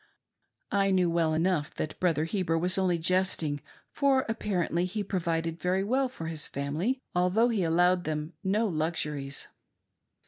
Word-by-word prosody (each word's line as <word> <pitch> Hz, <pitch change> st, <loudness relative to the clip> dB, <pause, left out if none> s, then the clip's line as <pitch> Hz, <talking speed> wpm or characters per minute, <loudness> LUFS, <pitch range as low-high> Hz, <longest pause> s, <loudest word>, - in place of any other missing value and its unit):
I 195 Hz, -1 st, +3 dB
knew 185 Hz, -3 st, +3 dB
well 165 Hz, -1 st, +2 dB
enough 165 Hz, -2 st, 0 dB
that 155 Hz, -, -4 dB
Brother 165 Hz, -4 st, +2 dB
He 190 Hz, +4 st, -1 dB
ber 165 Hz, -2 st, +1 dB
was 180 Hz, +3 st, +1 dB
only 180 Hz, -2 st, +2 dB
jesting, 165 Hz, -4 st, 0 dB, 0.3 s
for 270 Hz, -2 st, +2 dB
apparently 180 Hz, -6 st, 0 dB
he 205 Hz, +3 st, -3 dB
provided 165 Hz, -3 st, -2 dB
very 185 Hz, +2 st, +1 dB
well 260 Hz, +5 st, +1 dB
for 165 Hz, -10 st, -8 dB
his 160 Hz, -2 st, -2 dB
family, 165 Hz, -, -2 dB
althbugh 200 Hz, +7 st, +3 dB
he 210 Hz, -, +1 dB
allowed 175 Hz, +2 st, +3 dB
them 155 Hz, +1 st, -3 dB
no 205 Hz, +4 st, +2 dB
luxuries. 150 Hz, -5 st, -2 dB
180 Hz, 150 wpm, -29 LUFS, 160-195 Hz, 0.3 s, I